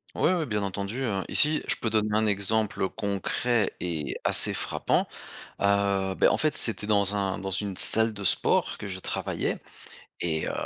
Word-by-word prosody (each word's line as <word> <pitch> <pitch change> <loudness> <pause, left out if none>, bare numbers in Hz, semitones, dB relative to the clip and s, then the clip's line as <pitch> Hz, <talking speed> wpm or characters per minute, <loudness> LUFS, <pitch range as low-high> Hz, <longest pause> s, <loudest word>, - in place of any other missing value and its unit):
Ouais, 185 - 0
ouais 165 -4 -3
bien 105 -4 -4
entendu, 100 +6 -6
heu, 100 -6 -3
ici 150 +1 +4
je - - 0
peux 115 - -4
donner 110 -1 -1
un 110 +1 0
exemple, 105 +1 +1
heu, 95 - 0
concret 105 +3 -3
et 85 -4 -5
assez - - +7
frappant. - - -2 0.6
Heu, 100 -1 -1
beh, - - +2
en - - -1
fait 155 -1 -1
c'était 110 -2 +6
dans 100 -1 0
un 95 -1 -3
dans 95 0 -7
une 95 0 -3
salle 110 +4 +4
de 100 -1 -9
sport - - +1
que 105 - -9
je 95 -1 -7
travaillais. - - -5 0.6
Et 80 -2 -4
heu, - - -4
100 Hz, 185 wpm, -24 LUFS, 95-110 Hz, 0.6 s, assez